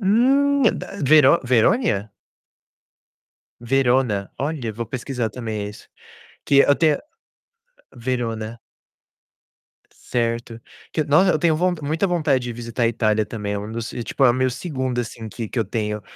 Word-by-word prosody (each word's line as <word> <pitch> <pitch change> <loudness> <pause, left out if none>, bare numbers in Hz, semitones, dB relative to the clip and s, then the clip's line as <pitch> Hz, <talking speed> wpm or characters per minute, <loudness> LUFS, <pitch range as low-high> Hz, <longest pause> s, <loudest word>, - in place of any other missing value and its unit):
Hum, 270 +7 +3 0.2
da, - - -8
Vero 150 +2 +6
Verônia? 115 - +2 1.5
Verona. 120 -5 +1
Olha, 140 -5 -2
vou 115 +2 -5
pesquisar, 125 -2 -3
também, 110 -3 -5
isso. 105 - -14 0.6
Que 140 -1 +6
até 150 +1 +3 1.0
Verona. 115 -2 -3 1.3
Certo. 115 -1 -3 0.3
Que 155 - 0
nossa, 170 +6 +4
eu - - 0
tenho 160 0 +3
von 180 +3 +1
muita 160 +6 0
vontade 150 -7 +1
de 120 - -4
visitar 115 +1 -3
a 115 - +4
Itália, 110 -2 +1
também, 105 -3 -4
é 100 - -2
um 105 +2 -7
dos 115 0 -5
e, 120 - -4
tipo, 135 - -1
é 125 - +6
o - - +3
meu 130 +1 +1
2º, 130 -2 -3
assim, 115 -1 -5
que 115 0 -6
que 120 - -3
eu 110 - 0
tenho. 105 0 -3
125 Hz, 150 wpm, -22 LUFS, 115-150 Hz, 1.5 s, Vero